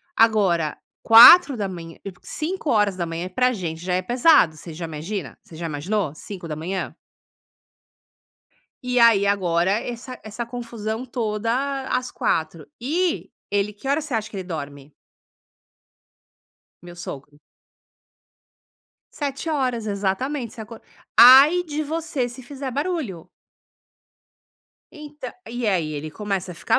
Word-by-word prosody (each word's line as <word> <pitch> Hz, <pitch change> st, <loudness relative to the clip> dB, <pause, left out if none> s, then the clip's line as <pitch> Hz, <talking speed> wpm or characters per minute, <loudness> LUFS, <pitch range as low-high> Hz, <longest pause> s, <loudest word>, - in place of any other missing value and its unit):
Agora, 195 Hz, -9 st, +2 dB, 0.3 s
4h00, 225 Hz, -, +7 dB
eu 195 Hz, -, -5 dB
5h00 200 Hz, -, -2 dB
pra 250 Hz, +7 st, +1 dB
gente 165 Hz, -6 st, -5 dB
já 180 Hz, 0 st, -2 dB
é 185 Hz, -, 0 dB
pesado. 240 Hz, -, +4 dB
Você 165 Hz, +1 st, -10 dB
já 165 Hz, +2 st, -6 dB
imagina 160 Hz, +2 st, -6 dB
você 165 Hz, -, -15 dB
já 170 Hz, +1 st, -6 dB
imaginou, 160 Hz, +2 st, -2 dB
5h00? 175 Hz, 0 st, -6 dB, 1.9 s
E 250 Hz, 0 st, 0 dB
aí 230 Hz, -4 st, +5 dB
agora 180 Hz, -3 st, +1 dB
essa 240 Hz, +4 st, -4 dB
essa 215 Hz, +2 st, -5 dB
confusão 230 Hz, -1 st, -5 dB
toda 245 Hz, +4 st, -2 dB
às 250 Hz, 0 st, -1 dB
4h00. 160 Hz, 0 st, -2 dB
E 330 Hz, +7 st, -1 dB, 0.2 s
ele 205 Hz, +1 st, -1 dB
que 210 Hz, +6 st, -13 dB
horas 285 Hz, +3 st, 0 dB
você 295 Hz, -5 st, -5 dB
acha 215 Hz, -1 st, -2 dB
que 215 Hz, -, -17 dB
ele 190 Hz, -, -3 dB
dorme? 145 Hz, -4 st, -7 dB, 1.9 s
Meu 175 Hz, 0 st, -11 dB
sogro. 145 Hz, -3 st, -9 dB, 1.8 s
7h00, 275 Hz, -5 st, -2 dB
exatamente. 215 Hz, +6 st, -2 dB
Você 235 Hz, -, -10 dB
acor 225 Hz, +1 st, -11 dB, 0.4 s
Ai 275 Hz, +8 st, +8 dB
de 310 Hz, -3 st, -4 dB
você 310 Hz, -4 st, -2 dB
se 250 Hz, +2 st, -11 dB
fizer 270 Hz, +1 st, -6 dB
barulho. 280 Hz, -, -3 dB, 1.6 s
Entã 300 Hz, -5 st, -9 dB, 0.2 s
E 240 Hz, 0 st, -4 dB
aí 170 Hz, -7 st, 0 dB
ele 150 Hz, +1 st, -5 dB
começa 195 Hz, 0 st, -4 dB
a -, -, -12 dB
ficar -, -, +1 dB
215 Hz, 120 wpm, -22 LUFS, 175-255 Hz, 1.9 s, Ai